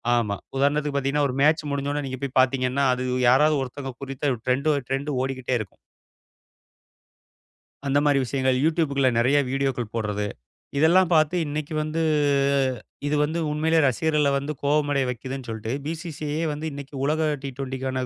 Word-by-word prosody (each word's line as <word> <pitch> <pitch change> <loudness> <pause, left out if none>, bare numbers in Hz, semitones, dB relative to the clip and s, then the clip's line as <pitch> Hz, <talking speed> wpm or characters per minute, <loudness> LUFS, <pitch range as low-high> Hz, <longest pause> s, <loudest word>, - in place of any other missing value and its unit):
ஆமா. 105 -4 0 0.2
உதாரணத்துக்கு 145 +1 +1
பாத்தீங்கன்னா 140 +1 +1
ஒரு 125 - -3
மேட்ச் 155 0 +3
முடிஞ்ச 140 0 -1
உடனே 145 -1 -2
நீங்கப் 130 +1 -6
போய் 135 -1 -4
பாத்தீங்கன்னா 130 +1 +1
அது 125 0 -3 0.2
யாராவது 150 +4 +5
ஒருத்தங்க 135 +1 -6
குறித்த 135 0 -1
டிரெண்ட் 135 +4 +1 0.2
டிரெண்டு 135 0 -1
ஓடிக்கிட்டே 130 -1 -2
இருக்கும். 105 - -8 2.1
அந்த 140 +1 +3
மாதிரி 145 -2 +4
விஷயங்கள் 130 0 0
YoutTubeகுள்ள 150 -4 +2
நிறைய 135 +5 +3
வீடியோக்கள் 135 -4 -1
போடுறது. 105 -2 -1 0.5
இதெல்லாம் 170 +4 +5
பாத்து 155 +2 +3
இன்னைக்கு 150 +1 -4
வந்து, 155 +2 -2 1.1
இது 150 - +1
வந்து 160 +3 -1
உண்மையில 160 +2 +2
ரசிகர்கள 150 +3 +1
வந்து 140 +2 -3
கோபமடைய 145 -2 +2
வைக்குதுன்னு 130 +1 -5
சொல்லிட்டு 110 +2 -4
பி.சி.சி.ஐயே 155 -1 -4
வந்து 150 +2 -5
இன்னைக்கு 140 0 -9
உலக 155 +1 +1 0.2
டி20க்கான 130 -1 -3
140 Hz, 140 wpm, -24 LUFS, 130-150 Hz, 2.1 s, யாராவது